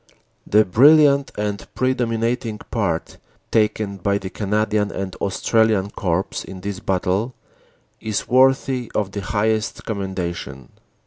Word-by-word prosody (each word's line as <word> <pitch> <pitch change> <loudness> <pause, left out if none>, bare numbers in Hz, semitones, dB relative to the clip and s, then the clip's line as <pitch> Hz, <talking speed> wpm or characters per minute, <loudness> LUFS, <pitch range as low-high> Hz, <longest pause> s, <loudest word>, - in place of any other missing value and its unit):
"The 105 +1 +4
brilliant 140 - +5
and 105 -1 -3
predominating 120 -2 -1
part 95 -8 -2 0.3
taken 105 -2 +1
by 100 +2 0
the 95 -1 -7
Cana 105 +1 0
dian 105 -1 0
and 95 -2 -5
Australian 105 0 +1
Corps 90 0 -2
in 95 -1 -9
this 100 0 -4
battle 95 +6 -1 0.6
is 110 -2 -3
worthy 130 -1 +2
of 100 -2 0
the 100 - -4
highest 110 +2 -1
commendation. 90 - -4
105 Hz, 120 wpm, -21 LUFS, 95-115 Hz, 0.6 s, brilliant